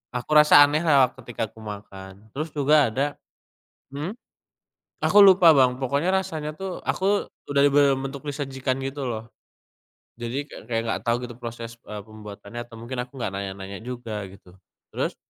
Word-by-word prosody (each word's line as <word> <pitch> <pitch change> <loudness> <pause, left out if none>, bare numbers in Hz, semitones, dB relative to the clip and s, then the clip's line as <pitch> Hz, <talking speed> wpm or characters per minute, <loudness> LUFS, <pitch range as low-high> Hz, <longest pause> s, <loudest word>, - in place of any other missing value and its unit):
aku 125 +4 -4
rasa 150 -1 +9
aneh 150 +2 0
lah 140 -6 +5
ketika 120 -2 -4
aku 110 +1 -17
makan. 100 0 -10
Terus 155 +4 -4
juga 145 -2 +4
ada 135 +5 0 0.9
mhm. 150 +8 -4 0.9
Aku 205 - +5
lupa 185 -4 +8
Bang, 130 -3 +4
pokoknya 140 +5 -1
rasanya 160 -5 -2
tuh 190 -1 -5
aku 200 +2 0 0.2
udah 140 - +3
di - - +5
dalam 140 -1 +4
bentuk 140 +1 -9
disajikan 135 -2 -3
gitu 135 +1 -4
loh. 115 -2 -5 0.9
Jadi 125 +5 -3
ka - - -10
kayak 115 -1 0
enggak 115 - -2
tahu 115 - +3
gitu 120 -1 -8
proses, 115 -1 -7
e 105 - -8
pembuatannya 105 +1 -10
atau 115 -1 -13
mungkin 125 +2 -6
aku 125 +1 -12
enggak 120 -6 -3
nanya-nanya 95 0 -6
juga 115 -4 -6
gitu. 95 -1 -16 0.3
Terus - - -2
130 Hz, 165 wpm, -24 LUFS, 110-145 Hz, 0.9 s, rasa